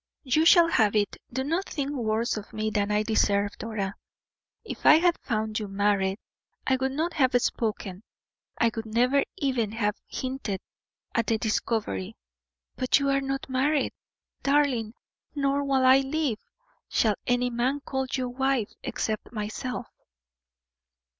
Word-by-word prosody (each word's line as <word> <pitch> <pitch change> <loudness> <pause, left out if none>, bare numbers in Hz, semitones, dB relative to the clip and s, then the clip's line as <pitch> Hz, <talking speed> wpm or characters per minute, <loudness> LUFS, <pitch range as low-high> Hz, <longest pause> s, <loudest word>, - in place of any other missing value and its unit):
"You 305 +4 +2
shall 340 -2 +7
have 220 -10 +3
it. 205 -1 +1 0.2
Do 260 +2 -1
not 335 +7 -1
think 285 -2 -2
worse 230 -3 0
of 215 0 -8
me 215 0 -1
than 205 -1 0
I 210 0 +2
deserve, 205 -2 +1
Dora. 205 -3 -3 0.7
If - - -7
I - - +8
had 340 +2 +4
found 215 -2 -2
you 210 - -4
married, 195 -1 +1 0.5
I 265 - +2
would 265 +1 -1
not 325 +4 -1
have 255 -3 +3
spoken, 210 -6 -2 0.6
I 230 - +3
would 225 -1 -4
never 250 +5 +3
even 245 -7 0
have 210 -2 -1
hinted 255 -7 -4 0.5
at 230 -1 +1
the 225 - +2
discovery; 215 - -1 0.6
but 255 - +3
you 280 0 0
are 275 0 +2
not 270 0 -3
married, 275 +3 +1 0.5
darling, 275 -6 +1 0.4
nor, 280 0 +1
while 270 -2 +2
I 260 +1 +7
live, 270 -4 -1 0.5
shall 220 -2 +3
any 245 0 +1
man 255 +4 0
call 265 -1 -2
you 255 -1 -1
wife 260 -2 0
except 215 -1 -3
myself." 235 +3 -4
245 Hz, 145 wpm, -27 LUFS, 215-275 Hz, 0.7 s, I